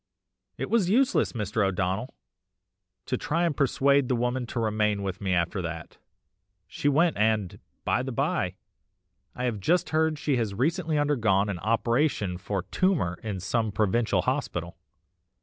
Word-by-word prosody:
"It -, -, -4 dB
was 215 Hz, -6 st, +3 dB
useless, 260 Hz, +6 st, +2 dB
Mr. 105 Hz, -2 st, -1 dB
O'Donnell, 95 Hz, +5 st, -1 dB, 0.9 s
to -, -, -1 dB
try 165 Hz, +3 st, 0 dB
and 165 Hz, -4 st, +1 dB
persuade 140 Hz, 0 st, +3 dB
the 125 Hz, -, +1 dB
woman 125 Hz, +1 st, -1 dB
to 120 Hz, -, -4 dB
remain 105 Hz, -2 st, 0 dB
with 95 Hz, 0 st, -4 dB
me 95 Hz, -2 st, -1 dB
after 85 Hz, +3 st, 0 dB
THAT, 85 Hz, -2 st, -7 dB, 0.7 s
she 145 Hz, -, -1 dB
went 160 Hz, +4 st, +3 dB
and, 105 Hz, -3 st, +1 dB, 0.3 s
by -, -, +2 dB
the -, -, -4 dB
bye, -, -, -1 dB, 0.8 s
I 125 Hz, -, -4 dB
have 120 Hz, -4 st, -1 dB
just 175 Hz, -, +1 dB
heard 160 Hz, 0 st, +2 dB
she 145 Hz, -2 st, 0 dB
has 110 Hz, -4 st, -1 dB
recently 160 Hz, -, 0 dB
undergone 110 Hz, -9 st, +2 dB
an 95 Hz, -4 st, -3 dB
operation 115 Hz, -, 0 dB
for 100 Hz, -1 st, -3 dB
tumour 145 Hz, -, 0 dB
in 105 Hz, -4 st, -4 dB
some 110 Hz, +2 st, 0 dB
provincial 110 Hz, +3 st, +1 dB
hospital. 90 Hz, -, -2 dB
115 Hz, 150 wpm, -27 LUFS, 100-145 Hz, 0.9 s, was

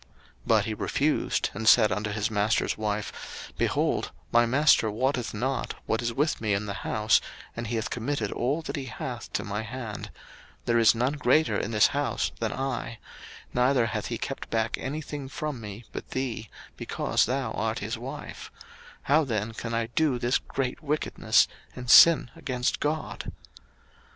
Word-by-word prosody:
01:039:008 -, -, -26 dB, 0.4 s
But -, -, +4 dB
he -, -, -2 dB
refused, -, -, 0 dB
and 110 Hz, 0 st, +3 dB
said 110 Hz, -4 st, +6 dB
unto 105 Hz, +3 st, -1 dB
his 105 Hz, +1 st, -1 dB
master's 105 Hz, +1 st, +1 dB
wife, 105 Hz, -1 st, -5 dB
Behold, -, -, 0 dB, 0.2 s
my 120 Hz, 0 st, +5 dB
master 135 Hz, -3 st, +4 dB
wotteth 125 Hz, +3 st, -1 dB
not 130 Hz, +5 st, -2 dB
what 110 Hz, -, 0 dB
is 120 Hz, 0 st, -1 dB
with 145 Hz, +4 st, 0 dB
me 105 Hz, -3 st, +1 dB
in 100 Hz, +2 st, -2 dB
the 100 Hz, -, -3 dB
house, 110 Hz, 0 st, +2 dB, 0.3 s
and 115 Hz, 0 st, -4 dB
he 115 Hz, -, -2 dB
hath 110 Hz, -1 st, -2 dB
committed 120 Hz, -3 st, -2 dB
all 140 Hz, +7 st, -1 dB
that -, -, -4 dB
he 135 Hz, -, -4 dB
hath 125 Hz, -, -6 dB
to -, -, -1 dB
my 105 Hz, +1 st, -3 dB
hand; 115 Hz, -2 st, -6 dB, 0.6 s
01:039:009 -, -, -35 dB
There 115 Hz, -1 st, +2 dB
is 115 Hz, 0 st, +6 dB
none 125 Hz, +4 st, +1 dB
greater 145 Hz, -3 st, +3 dB
in 105 Hz, -, -1 dB
this 105 Hz, -2 st, +4 dB
house -, -, -1 dB
than -, -, -1 dB
I; 130 Hz, -3 st, -3 dB, 0.6 s
neither 125 Hz, 0 st, +3 dB
hath -, -, -3 dB
he -, -, -3 dB
kept -, -, -5 dB
back 110 Hz, -1 st, 0 dB
any 150 Hz, +4 st, -3 dB
thing 145 Hz, -2 st, -6 dB
from 145 Hz, -3 st, -4 dB
me 105 Hz, +2 st, -8 dB
but -, -, -7 dB
thee, 120 Hz, -5 st, -3 dB, 0.3 s
because -, -, 0 dB
thou 130 Hz, -2 st, -1 dB
art 110 Hz, +1 st, -1 dB
his 110 Hz, +4 st, -3 dB
wife: 130 Hz, +3 st, -8 dB, 0.5 s
how 155 Hz, +3 st, +4 dB
then 110 Hz, -4 st, -2 dB
can 115 Hz, +1 st, -4 dB
I 115 Hz, 0 st, +1 dB
do 130 Hz, +3 st, +1 dB
this 120 Hz, +1 st, +1 dB
great 135 Hz, +1 st, -3 dB
wickedness, 150 Hz, 0 st, +2 dB, 0.3 s
and 125 Hz, -1 st, -2 dB
sin 165 Hz, -7 st, +8 dB
against 125 Hz, -2 st, -1 dB
God? 155 Hz, +1 st, -3 dB
120 Hz, 175 wpm, -27 LUFS, 110-135 Hz, 0.6 s, sin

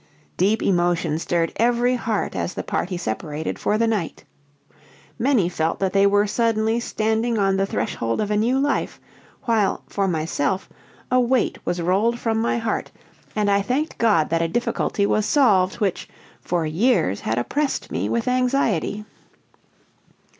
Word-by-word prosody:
Deep 205 Hz, +5 st, +2 dB
emotion 175 Hz, -3 st, +1 dB
stirred 165 Hz, -1 st, -1 dB
every 240 Hz, +2 st, +2 dB
heart 230 Hz, -4 st, -2 dB
as 175 Hz, -, -3 dB
the -, -, -3 dB
party 180 Hz, 0 st, -2 dB
separated 150 Hz, +2 st, -4 dB
for 210 Hz, -, +1 dB
the 230 Hz, -, +2 dB
night. 210 Hz, -7 st, -2 dB, 1.0 s
Many 240 Hz, -7 st, +2 dB
felt 160 Hz, -2 st, -1 dB
that 190 Hz, -1 st, -1 dB
they 200 Hz, 0 st, +5 dB
were 205 Hz, +1 st, +3 dB
suddenly 225 Hz, +1 st, +1 dB
standing 225 Hz, 0 st, -1 dB
on 195 Hz, -1 st, +2 dB
the 195 Hz, 0 st, 0 dB
threshold 115 Hz, -10 st, -2 dB
of 210 Hz, -1 st, -1 dB
a -, -, +2 dB
new 235 Hz, +5 st, +2 dB
life, 280 Hz, +1 st, -1 dB, 0.4 s
while, 225 Hz, -6 st, +1 dB
for 195 Hz, -1 st, -1 dB
myself, 165 Hz, +1 st, -1 dB, 0.4 s
a 255 Hz, -, +4 dB
weight 250 Hz, 0 st, +1 dB
was 175 Hz, -1 st, -1 dB
rolled 205 Hz, +7 st, +2 dB
from 225 Hz, -2 st, -1 dB
my 235 Hz, -, 0 dB
heart, 230 Hz, -1 st, -2 dB, 0.5 s
and 210 Hz, -1 st, +1 dB
I 200 Hz, 0 st, +3 dB
thanked 265 Hz, +9 st, -2 dB
God 205 Hz, -10 st, +3 dB
that 165 Hz, 0 st, +2 dB
a 165 Hz, -, +1 dB
difficulty 205 Hz, 0 st, -1 dB
was 215 Hz, +1 st, +1 dB
solved 195 Hz, -10 st, +3 dB
which, 200 Hz, -5 st, -2 dB, 0.3 s
for 170 Hz, -2 st, -1 dB
years, 160 Hz, -, +1 dB
had 110 Hz, -, -2 dB
oppressed 280 Hz, -, -2 dB
me -, -, -2 dB
with 235 Hz, +1 st, -1 dB
anxiety. 250 Hz, -, 0 dB
205 Hz, 155 wpm, -22 LUFS, 175-235 Hz, 1.0 s, they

